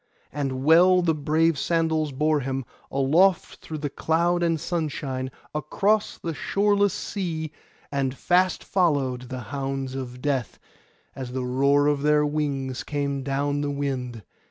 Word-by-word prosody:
And 135 -2 -2
well 180 +4 +6
the 165 -2 +3
brave 155 +1 +1
sandals 160 -3 +1
bore 150 +3 +1
him, 135 -1 -3 0.2
aloft 165 +8 +2
through 155 - -7
cloud 160 +4 0
and 165 -2 +1
sunshine, 145 -6 -3 0.2
across 195 +8 0
the 165 - -4
shoreless 205 +4 +2
sea; 165 -7 -4 0.4
and 135 -2 -1
fast 180 +1 +2
followed 135 -9 0
the 130 -1 -5
hounds 135 -1 -3
of 125 -2 -6
Death, 135 -4 -1 0.6
as 125 -2 -6
the 130 -1 -2
roar 140 +3 +3
of 145 -1 +2
their 150 0 +3
wings 140 -4 -2
came 140 -2 -2
down 140 +2 -1
the 145 - -1
wind. 130 -5 -3
145 Hz, 135 wpm, -25 LUFS, 135-165 Hz, 0.6 s, well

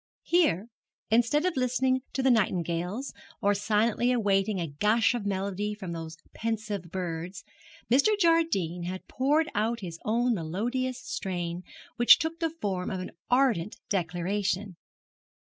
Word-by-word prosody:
Here, 310 - +2 0.5
instead 240 +8 +3
of 365 - 0
listening 255 0 +1
to 265 - -1
the 265 - +5
nightingales, 180 - 0 0.3
or 205 +1 +3
silently 220 +4 +1
awaiting 205 -4 +1
a 170 - -1
gush 210 - +2
of 225 -4 -3
melody 200 +1 -2
from 190 -4 -7
those 165 -1 -6 0.2
pensive 215 -5 -3
birds, 175 0 -5 0.4
Mr. 285 - +4
Jardine 325 - +2
had 185 +1 -6
poured 295 +5 +1
out 225 +2 0
his 170 -3 -7
own 240 +3 +2
melodious 235 +9 -2
strain, 180 -6 -4 0.4
which 240 - +8
took 320 +2 -3
the 330 -1 +1
form 200 - -3
of 190 - -3
an 185 - -6 0.2
ardent 245 -8 +2
declaration. 190 +2 -1
210 Hz, 135 wpm, -28 LUFS, 180-250 Hz, 0.5 s, which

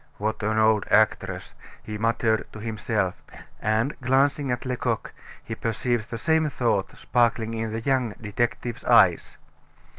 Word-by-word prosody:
"What 110 +2 -2
an 110 +1 0
old 110 -1 +3
actress!" - - +1 0.3
he 105 -1 -6
muttered 115 0 +1
to 110 - -8
himself, 110 -3 -2 0.4
and, 110 +6 +1
glancing 135 +2 +2
at 125 +1 -2
Lecoq, 125 -1 -2 0.3
he 110 - -6
perceived 115 0 -2
the 115 - -4
same 160 +4 +2
thought 120 -7 -1
sparkling 115 -2 +1
in 110 -1 -3
the 115 +1 -3
young 130 -3 0
detective's 120 +2 -2
eyes. - - +4
115 Hz, 140 wpm, -25 LUFS, 110-125 Hz, 0.4 s, eyes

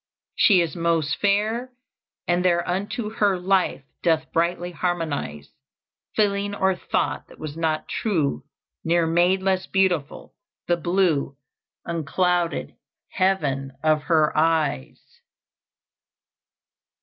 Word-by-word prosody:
"She 190 -5 +5
is 165 -4 -2
most 165 -3 +1
fair, 220 +5 0 0.5
and 175 +1 +2
thereunto 185 +5 0
Her 205 -3 +2
life 185 -5 +1 0.2
doth 160 -2 +1
brightly 175 +1 0
harmonize; 155 - -3 0.7
Feeling 205 -1 +1
or 190 -1 +2
thought - - -2
that - - -16
was 155 -1 -7
not 160 -1 -1
true 155 - -1 0.4
Ne'er 170 0 +2
made 175 +3 +2
less 190 -1 0
beautiful 180 -7 0 0.3
the 175 - +3
blue 170 -6 0 0.5
Unclouded 170 +1 -1 0.4
heaven 145 -8 0
of 155 -1 +3
her 155 -1 +2
eyes." 155 - -1
175 Hz, 100 wpm, -24 LUFS, 155-190 Hz, 0.7 s, She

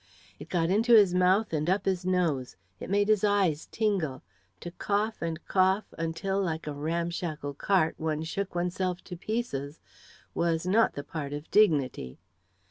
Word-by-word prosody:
It - - -10
got 170 -1 +1
into 230 +4 +5
his 200 -5 +6
mouth 185 +3 +3
and 155 +1 0
up 190 +2 +1
his 185 -1 -1
nose; 165 -9 0 0.2
it - - -7
made 205 +1 +2
his 215 -2 +3
eyes 195 -7 +2
tingle. 185 - -1 0.4
To 175 - -6
cough 210 +4 -1
and 165 -1 -4
cough 190 +2 +1
until, 165 +4 -2
like 160 -4 -2
a 150 - -4
ramshackle 160 -1 -3
cart, 165 +2 +1
one 155 -1 -2
shook 185 +4 -4
oneself 180 +1 -2
to 180 - -8
pieces, 165 - -4 0.5
was 165 -1 0
not 215 +5 +3
the 145 - -6
part 145 -1 -5
of 145 +2 -7
dignity. 145 - +2
175 Hz, 160 wpm, -28 LUFS, 155-195 Hz, 0.5 s, his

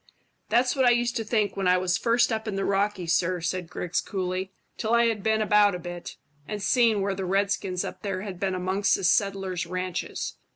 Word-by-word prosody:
"That's 245 +4 +2
what 265 - +2
I - - +7
used 240 0 +1
to 225 - -2
think 215 -1 0
when 195 -2 -1
I 180 0 +5
was 180 0 +1
first 235 +3 +2
up 220 0 -3
in 205 - -2
the 195 - -1
Rockies, 195 -4 +1
sir," 180 +2 0
said 180 0 -3
Griggs 180 0 -2
coolly, 185 -1 -3 0.2
"till 225 +1 0
I 235 0 +4
had 225 -3 0
been 220 +1 +1
about 210 -2 +4
a - - -5
bit, 175 0 -8 0.3
and 210 - -4
seen 225 0 +3
where 195 0 0
the 195 0 -4
redskins 195 -1 0
up - - -7
there 195 -2 -3
had 190 -4 -7
been 190 -1 -1
amongst 190 +2 +1
the 195 - -5
settlers' 190 -2 +1
ranches. 185 0 -4
195 Hz, 215 wpm, -26 LUFS, 185-215 Hz, 0.3 s, I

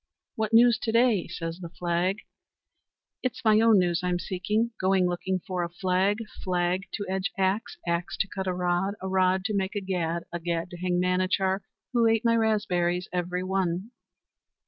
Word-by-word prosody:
"What 220 -1 -1
news 235 0 +6
to 225 - -2
day?" 230 -4 +3
says 165 +1 -5
the 170 -2 -7
flag. 175 +4 -1 1.0
"It's 255 -2 -3
my 215 -1 +6
own 225 -2 +6
news 175 -2 +2
I'm 180 -1 +1
seeking. 210 +6 -1
Going 190 -1 +3
looking 180 +2 -1
for 185 -2 -2
a 170 - -2
flag, 185 +3 +1 0.3
flag 180 +1 0
to 205 - -3
edge 190 +2 -1
axe, 195 +3 0
axe 170 +1 -1
to - - 0
cut 190 -1 -5
a 185 - +1
rod, 180 +2 0
a 190 - -5
rod 190 0 +2
to 215 - -1
make 195 +1 -1
a - - +1
gad, 170 -3 -2
a 175 - -2
gad 170 0 -2
to 175 - -8
hang 180 0 0
Manachar, 185 +1 +1 0.3
who 235 -2 +4
ate 225 +1 +2
my 230 0 +4
raspberries 180 -6 +1
every 180 0 -1
one." 190 +2 -1
185 Hz, 180 wpm, -27 LUFS, 175-205 Hz, 1.0 s, news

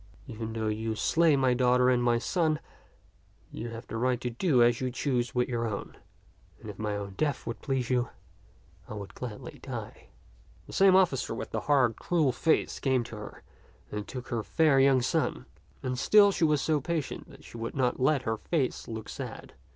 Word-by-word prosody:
Even 115 -3 -6
though 110 -1 -2
you 110 +1 -2
slay 165 +6 +3
my 130 -2 +3
daughter 125 0 +3
and 125 -1 +3
my 120 -1 +3
son, 155 +3 0 0.9
you 115 - -5
have 115 +1 -8
the 115 - -5
right 125 +1 +1
to 125 -1 -3
do 125 0 +3
as 120 +1 +3
you 130 - 0
choose 125 -1 -1
with 125 0 +2
your 115 -2 -1
own; 100 -2 -5 0.6
and 110 - -7
if 100 - -16
my 105 -1 -2
own 100 -1 -5
death 145 -2 -1
would 115 - -5
please 130 -3 -1
you, 125 -1 +1 0.8
I 110 - -6
would 100 -2 -8
gladly 120 -4 -8
die." - - -7 0.6
The - - -12
same 195 -1 +6
officer 165 -11 +2
with - - -6
the - - -1
hard, 130 -6 +4
cruel 160 -6 +1
face 160 +5 +1
came 130 -3 +1
to 115 - -9
her 105 -1 -9 0.5
and 105 -1 -4
took 125 -1 -7
her 115 -2 -1
fair 150 +3 +3
young 135 -2 +4
son; - - 0 0.4
and 125 -1 -2
still 205 +6 +6
she 170 - +1
was 150 -2 +2
so 155 -2 +1
patient 160 -1 -3
that - - -15
she - - -11
would 115 0 -5
not 125 -3 +1
let 135 +1 +2
her 110 -2 -1
face 140 +1 -2
look 110 -1 -6
sad. - - -7
125 Hz, 195 wpm, -29 LUFS, 115-140 Hz, 0.9 s, same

